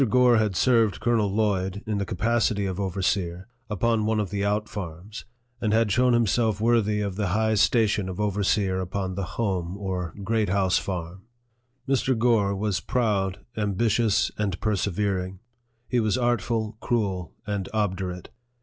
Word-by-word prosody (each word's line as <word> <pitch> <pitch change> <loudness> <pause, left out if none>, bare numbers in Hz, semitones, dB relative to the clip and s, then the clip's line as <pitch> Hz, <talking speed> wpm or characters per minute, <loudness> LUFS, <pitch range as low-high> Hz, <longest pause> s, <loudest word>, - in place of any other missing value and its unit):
Gore 125 +1 +5
had 105 -3 +1
served 115 -2 +3
Colonel 115 -4 +1
Lloyd, 100 -2 0
in 105 -2 -1
the 100 - -2
capacity 110 +1 +1
of 95 0 -3
overseer, 95 -2 -1 0.2
upon 110 +2 +1
one 110 -1 +1
of 100 -3 -2
the 100 -1 -1
out 105 +1 0
farms, 95 +1 -7 0.4
and 110 -2 +1
had 115 -2 +3
shown 125 +4 +3
himself 115 -2 +2
worthy 110 -2 +2
of 100 -2 -3
the 105 -2 0
high 110 +4 +1
station 105 -3 +2
of 95 - -6
overseer 100 -2 +1
upon 95 +1 -3
the 100 - -3 0.2
home 95 -5 -1
or 90 -4 -4
Great 110 0 0
House 95 -1 +2
Farm. 90 +1 -5 0.6
Mr. 130 -2 +1
Gore 110 -4 +2
was 100 -1 -1
proud, 105 -5 0
ambitious, 110 +1 +1
and 100 -4 -1
persevering. 100 -2 -1 0.5
He 125 - +1
was 110 +1 +1
artful, 115 -2 0
cruel, 95 -7 -1
and 100 -2 -3
obdurate. 95 -4 -2
105 Hz, 150 wpm, -25 LUFS, 95-110 Hz, 0.6 s, Gore